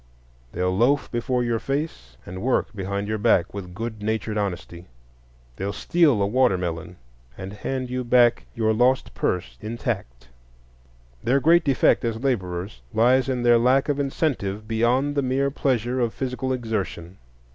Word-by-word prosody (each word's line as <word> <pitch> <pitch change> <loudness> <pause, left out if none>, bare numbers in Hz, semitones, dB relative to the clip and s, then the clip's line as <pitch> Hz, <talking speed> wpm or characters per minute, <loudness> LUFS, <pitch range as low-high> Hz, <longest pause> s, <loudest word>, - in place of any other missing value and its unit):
They'll 90 +1 -1
loaf 120 +2 +2
before 125 +1 0
your 120 -1 0
face 140 - -4
and 95 +1 -7
work 125 -2 0
behind 100 +1 -3
your 110 0 -2
back 90 -3 +2
with 90 -3 -7
good 110 0 -5
natured 110 0 -2
honesty. 90 -4 -4 0.7
They'll 100 +1 -2
steal 145 - +2
a - - +3
watermelon, 90 -7 0 0.4
and 95 +1 -7
hand 130 +4 -4
you 125 0 -2
back 120 -1 +3
your 110 -1 +2
lost 125 +4 +2
purse 90 - -2
intact. - - -4 1.0
Their 130 +4 +3
great 165 +4 +5
defect 135 -4 +3
as 115 -2 -1
laborers 95 - -2
lies 125 +3 +4
in 125 -2 -1
their 120 -1 +5
lack 130 +4 +3
of 145 -1 0
incentive 120 -8 -2
beyond 120 +6 +1
the 145 - +1
mere 135 +1 0
pleasure 130 -3 0
of 120 -2 0
physical 130 0 -3
exertion. 105 -7 -3
115 Hz, 150 wpm, -24 LUFS, 100-130 Hz, 1.0 s, great